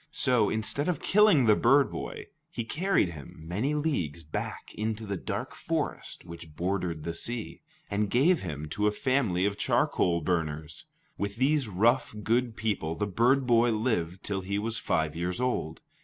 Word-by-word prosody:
So, 125 -6 +3
instead 110 +7 0
of 175 - 0
killing 205 - +5
the 105 -2 +6
bird 135 +5 +4
boy, - - -6 0.2
he 120 - -4
carried 175 - +1
him 80 -5 -10
many 110 - -1
leagues 90 - -1
back 75 - -5
into 110 0 -3
the 100 -1 -3
dark - - -4
forest - - -3
which 85 -2 -10
bordered 90 -3 -2
the 85 +1 -3
sea, 115 +6 -4 0.3
and 100 0 -1
gave 155 - +3
him 75 -5 -5
to 105 +6 0
a - - +3
family 110 -6 +1
of 100 0 -1
charcoal 85 -1 +2
burners. 80 -2 -2 0.3
With 100 0 -2
these 135 +2 +2
rough, 110 +5 +2
good 115 +1 +1
people 100 -7 -1
the 95 - -1
bird 125 +7 +2
boy 120 -1 +4
lived 95 -6 -1
till 100 -2 -2
he 100 +2 -2
was 110 +2 -2
five 80 -2 0
years 90 +4 -2
old. 125 -11 -1
105 Hz, 170 wpm, -28 LUFS, 85-125 Hz, 0.3 s, the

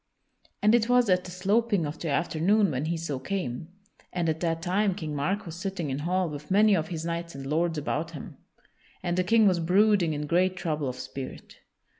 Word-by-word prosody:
And 210 +1 +5
it 235 -1 +3
was 245 -4 +4
at 180 0 +2
the - - -7
sloping 200 +1 +1
of 150 +2 -5
the 165 - -3
afternoon 175 +6 +2
when 135 +2 -2
he 165 +1 -1
so 150 -5 -3
came, 140 -3 -4 0.4
and 175 -2 -1
at 160 0 -1
that 165 -1 -1
time 190 +2 +1
King 155 -6 -5
Mark 190 +10 -1
was 165 -2 -7
sitting 180 -5 -3
in 135 - -2
hall 180 +4 0
with 150 -1 -8
many 205 +1 +5
of 160 -3 -1
his 165 -2 -5
knights 170 -1 -4
and 135 0 -7
lords 160 +3 0
about 155 +2 -2
him. 145 - -9 0.7
And 175 -1 0
the 185 - +2
King 225 +3 +4
was 180 -3 +3
brooding 185 0 +3
in 150 0 -3
great 180 +4 +2
trouble 155 -6 -2
of 125 - -5
spirit. 135 0 -8
170 Hz, 210 wpm, -27 LUFS, 155-195 Hz, 0.7 s, And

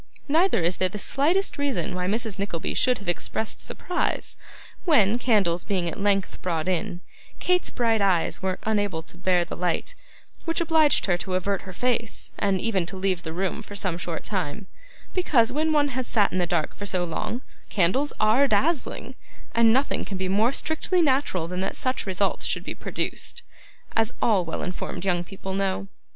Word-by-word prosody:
Neither 320 - +3
is 175 +2 +1
there 185 - +1
the 210 - -6
slightest 310 - +1
reason 280 -8 0
why 180 0 -2
Mrs. 215 0 -1
Nickleby 185 -5 -2
should 250 -1 +2
have 200 - -12
expressed 205 +5 -2
surprise 360 -1 -2 0.5
when, 235 - +4
candles 195 -9 +2
being 185 -4 -1
at 170 - -4
length 200 -1 +1
brought 165 -2 -1
in, 180 0 -1 0.4
Kate's 360 0 +2
bright 225 -3 +1
eyes 185 -4 +2
were 185 -1 -1
unable 205 -6 0
to - - -8
bear 180 -1 +2
the - - -6
light 175 -1 -1 0.5
which 330 -1 0
obliged 320 -3 +4
her 175 -3 +2
to 185 0 -3
avert 195 +1 0
her - - -5
face, 230 +2 -1
and 195 -2 +2
even 190 -5 0
to 190 - -5
leave 185 -2 0
the 160 - -5
room 185 +3 -2
for 205 - -10
some 190 -4 -1
short 170 -2 -4
time; 190 0 -3 0.5
because, 255 -10 +3
when 310 +4 +1
one 295 -2 +3
has 260 -1 -3
sat 205 -3 +3
in 185 - 0
the 175 - +1
dark 165 -3 0
so 185 -3 0
long, 175 +8 -3 0.3
candles 210 +10 +2
ARE 225 +7 +5
dazzling, 315 +2 0 0.4
and 230 -1 +5
nothing 265 +4 +1
can 195 - -5
be 185 0 -1
more 210 +6 +3
strictly 335 +5 +1
natural 260 - +1
than 180 +1 -4
that 190 - -2
such 255 -4 -2
results 190 +1 +1
should - - -1
be - - -4
produced, - - -3 0.5
as 225 +1 +1
all 205 -5 +3
well 165 -1 -4
informed 180 0 -4
young 175 -2 +1
people 190 +1 -7
know. 195 0 -1
200 Hz, 185 wpm, -25 LUFS, 180-250 Hz, 0.5 s, ARE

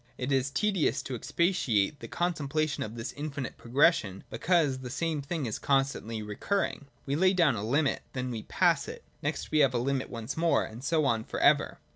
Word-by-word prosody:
It 125 +2 -3
is 135 0 +2
tedious 190 +4 +1
to 135 - -5
expatiate 125 - +1
in 150 - -23
the - - -8
contemplation 155 -4 -1
of 110 +1 -4
this 115 +2 -5
infinite 145 -3 -5
pro 115 - -14
gression, 120 - +3
because 160 -7 +2
the 130 -1 -7
same 160 +2 -1
thing 145 +1 -3
is 110 - -3
constantly 135 -5 0
recurring. 145 - -2 0.2
We 140 - -1
lay 185 +4 +4
down 165 -9 +3
a 100 - -4
limit: 140 +6 +1
then 125 -1 -3
we 115 -2 -4
pass - - +2
it: - - -8 0.2
next - - -3
we 155 - +3
have 135 -4 +4
a - - +3
limit 130 +2 -1
once 115 +2 -5
more, 165 0 +2
and 115 +3 -10
so 155 0 +2
on 115 -4 +1
for - - -5
ever. - - +3
140 Hz, 205 wpm, -29 LUFS, 120-155 Hz, 0.2 s, lay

